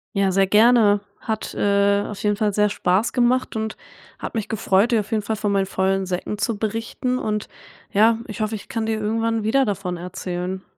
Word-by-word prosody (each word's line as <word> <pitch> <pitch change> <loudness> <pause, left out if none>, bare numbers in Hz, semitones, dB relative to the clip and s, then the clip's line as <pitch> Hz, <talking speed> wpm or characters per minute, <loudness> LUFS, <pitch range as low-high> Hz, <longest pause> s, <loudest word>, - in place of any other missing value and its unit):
Ja, 195 -1 +2
sehr 195 0 +3
gerne. 215 -1 +5 0.2
Hat, 220 -1 -4
äh, 200 0 +2
auf 210 - -7
jeden 210 0 +2
Fall 210 -1 +1
sehr 210 +1 +3
Spaß 195 +2 +1
gemacht 250 -1 +1
und 220 0 -3 0.4
hat - - -6
mich 220 -3 -3
gefreut, 205 +1 +2
dir 225 -2 +3
auf 210 +3 -12
jeden 215 -1 +1
Fall 220 +2 -2
von 210 -1 -1
meinen 195 -1 +2
vollen 190 0 0
Säcken 185 +3 -3
zu 220 -1 -1
berichten. 225 +4 -2
Und 210 -1 -2 0.4
ja, 220 +3 +4
ich 215 0 -6
hoffe, 215 +1 -1
ich 205 - -10
kann 225 -1 -2
dir 220 -1 -1
irgendwann 225 +1 0
wieder 265 +5 +3
davon 190 -4 -3
erzählen. 180 +1 -5
210 Hz, 200 wpm, -22 LUFS, 195-225 Hz, 0.4 s, gerne